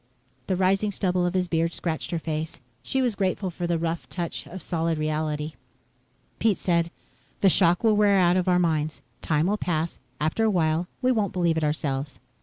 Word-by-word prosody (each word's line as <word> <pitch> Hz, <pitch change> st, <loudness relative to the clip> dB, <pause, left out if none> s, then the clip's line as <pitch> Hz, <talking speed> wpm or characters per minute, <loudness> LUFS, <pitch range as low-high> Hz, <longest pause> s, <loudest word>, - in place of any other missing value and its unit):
The 190 Hz, -, +1 dB
rising 195 Hz, +3 st, +2 dB
stubble 180 Hz, -2 st, 0 dB
of 175 Hz, -, -3 dB
his 180 Hz, -1 st, +1 dB
beard 165 Hz, 0 st, 0 dB
scratched 160 Hz, -2 st, -3 dB
her 170 Hz, -, -1 dB
face. 160 Hz, 0 st, -4 dB, 0.2 s
She 265 Hz, -1 st, 0 dB
was 245 Hz, -3 st, +1 dB
grateful 190 Hz, -1 st, -1 dB
for 175 Hz, +1 st, -3 dB
the 170 Hz, -1 st, +1 dB
rough 165 Hz, 0 st, -3 dB
touch 170 Hz, -2 st, -4 dB
of 185 Hz, +1 st, -8 dB
solid 165 Hz, -1 st, -1 dB
reality. 155 Hz, 0 st, -2 dB, 0.9 s
Pete 220 Hz, -4 st, +3 dB
said, 170 Hz, -2 st, +1 dB, 0.5 s
"The 195 Hz, -, +6 dB
shock 175 Hz, +1 st, +4 dB
will 220 Hz, -2 st, +4 dB
wear 205 Hz, -1 st, +4 dB
out 175 Hz, -1 st, +4 dB
of 185 Hz, 0 st, +1 dB
our 180 Hz, -1 st, +4 dB
minds. 155 Hz, -3 st, 0 dB, 0.2 s
Time 155 Hz, 0 st, +1 dB
will 205 Hz, +3 st, +1 dB
pass. 165 Hz, -4 st, -2 dB, 0.2 s
After 155 Hz, +9 st, 0 dB
a 220 Hz, -, +4 dB
while, 165 Hz, -2 st, +1 dB, 0.2 s
we 255 Hz, -, +4 dB
won't 215 Hz, -5 st, 0 dB
believe 170 Hz, -3 st, +2 dB
it 160 Hz, -, 0 dB
ourselves." 145 Hz, -2 st, -2 dB
175 Hz, 195 wpm, -25 LUFS, 160-190 Hz, 0.9 s, The